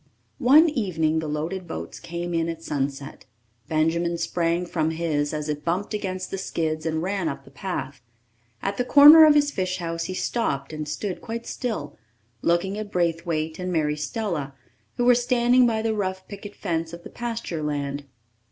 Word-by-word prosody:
One 290 +6 +7
evening 170 - 0
the 160 - -4
loaded 165 +5 -3
boats - - -6
came 175 +1 -5
in 165 0 0
at 165 0 -6
sunset. 140 -1 -4 0.4
Benjamin 170 +2 +1
sprang 170 +1 0
from 160 -2 0
his 160 -3 -1
as 150 -1 -3
it 150 -1 -3
bumped 185 +6 -1
against 185 -3 -3
the 195 - -3
skids, 160 -3 -2
and 160 0 -1
ran 190 -3 -1
up 140 - -7
the 135 - -16
path. 140 -4 -5 0.6
At 195 +1 -2
the 250 - +1
corner 295 +5 +10
of 300 - +6
his 290 0 +3
fish 185 -5 -2
house 165 -2 -3
he 185 - -4
stopped 150 - -2
and 155 -1 -4
stood 180 +5 -4
quite 235 0 -5
still, 215 - -4 0.4
looking 190 +4 +1
at 210 -1 -6
Braithwaite 165 -2 -1
and 180 0 -3
Mary 150 -3 +1
Stella, 150 - -3 0.4
who 245 - +1
were 245 - +7
standing 245 0 +4
by 220 -1 0
the 225 -1 +1
rough 190 -2 -3
picket 200 0 -9
fence 165 -3 -3
of 170 0 -9
the - - -10
pasture 230 -9 -4
land. 145 -1 -3
170 Hz, 180 wpm, -24 LUFS, 155-205 Hz, 0.6 s, corner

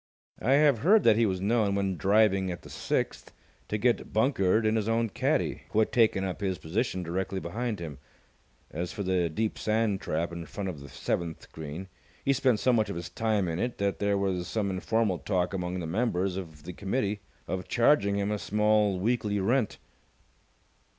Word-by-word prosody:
I 130 - +3
have 145 -4 +5
heard 200 - +5
that - - +6
he 115 0 +3
was 95 -2 -1
known, 105 0 +2
when 100 -1 0
driving 95 0 +3
at 85 -1 -6
the - - -12
sixth, - - -2 0.4
to 105 - -1
get 120 +2 +1
bunkered 110 -3 +2
in 110 +1 +2
his 110 0 0
own 115 0 +1
caddie, - - 0
who - - -4
had 110 - +3
taken 110 -5 +3
up 95 +1 -4
his 95 -2 -1
position 95 +3 -2
directly 95 +3 -2
behind 110 +5 -3
him. 75 -6 -7 0.7
As 85 +3 -3
for 100 - -4
the 90 -2 +1
deep 110 +7 -2
sand 110 -2 +1
trap 85 +2 -2
in 85 -1 -6
front 100 +2 -4
of 80 -6 -6
the 70 0 -11
seventh 85 -2 -3
green, 80 +4 -7 0.4
he 140 - +4
spent 130 -4 +2
so 130 - +3
much 110 -3 +2
of 100 - -4
his 85 0 -5
time 105 -1 0
in 85 0 -2
it 120 +3 -2
that 100 0 -1
there 100 0 +1
was 95 -3 -1
some 100 0 -1
informal 100 0 0
talk 90 -2 -1
among 90 -1 -2
the 85 - -4
members 95 0 0
of 80 -6 -7
the 90 +3 -7
committee 100 +1 -1 0.3
of 95 -1 -3
charging 115 -5 +3
him 100 +1 0
a 105 - -1
small 105 -2 +2
weekly 105 -1 0
rent. 115 +4 +1
100 Hz, 195 wpm, -28 LUFS, 90-110 Hz, 0.7 s, that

